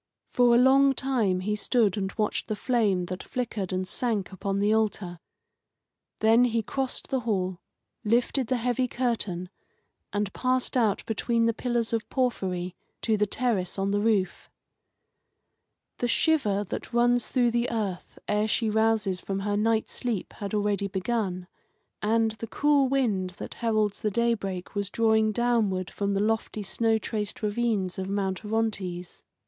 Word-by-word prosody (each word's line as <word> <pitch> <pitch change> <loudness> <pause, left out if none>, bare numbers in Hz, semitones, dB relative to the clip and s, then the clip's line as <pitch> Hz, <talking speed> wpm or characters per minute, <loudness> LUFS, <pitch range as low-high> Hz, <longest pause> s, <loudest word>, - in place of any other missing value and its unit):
For 245 -1 +5
a - - +6
long 270 +2 +5
time 230 -10 +1
he 210 +3 -1
stood 210 -2 +2
and 195 -2 -2
watched 215 -1 -1
the 215 - -2
flame 210 -6 +1
that 185 +1 -5
flickered 215 -7 -3
and 185 0 -2
sank 215 -4 -2
upon 195 +1 -2
the 205 +2 +2
altar. 205 -5 -1 1.0
Then 225 +3 +5
he 230 -2 0
crossed 265 +4 -3
the 265 - +1
hall, 190 -6 -1 0.4
lifted 240 +3 +1
the 255 - +1
heavy 245 +2 0
curtain, 215 -8 -2 0.6
and 205 -1 -2
passed 255 0 0
out 220 -5 +2
between 230 +1 0
the 230 - +2
pillars 235 -1 -1
of 225 -2 -1
porphyry 185 -9 -1 0.3
to 220 - +2
the 210 0 +1
terrace 210 -6 -1
on 195 0 0
the 205 - +1
roof. 205 -5 0 1.5
The 245 - +1
shiver 235 -8 +2
that 200 - -6
runs 240 0 +3
through 245 -2 +2
the 235 +1 0
earth 200 -6 -3
ere 210 +1 +1
she 220 0 0
rouses 220 -4 +1
from 195 0 -3
her 205 +1 -1
night 220 +1 +1
sleep 235 -7 -3
had 205 +1 -4
already 205 -1 0
begun, 190 -2 -2 0.6
and 225 +1 +2
the 225 +1 -7
cool 285 +1 +3
wind 205 -9 0
that - - -7
heralds 215 -3 0
the 215 - +1
daybreak 205 -5 -1
was 200 -1 -2
drawing 220 0 +3
downward 215 -6 +1
from 200 -1 -1
the - - +1
lofty 215 0 -1
snow 225 +3 +1
traced 215 -1 -4
ravines 210 -4 0
of 190 0 -3
Mount 195 -1 -1
Orontes. 200 -5 -2
215 Hz, 155 wpm, -27 LUFS, 195-235 Hz, 1.5 s, a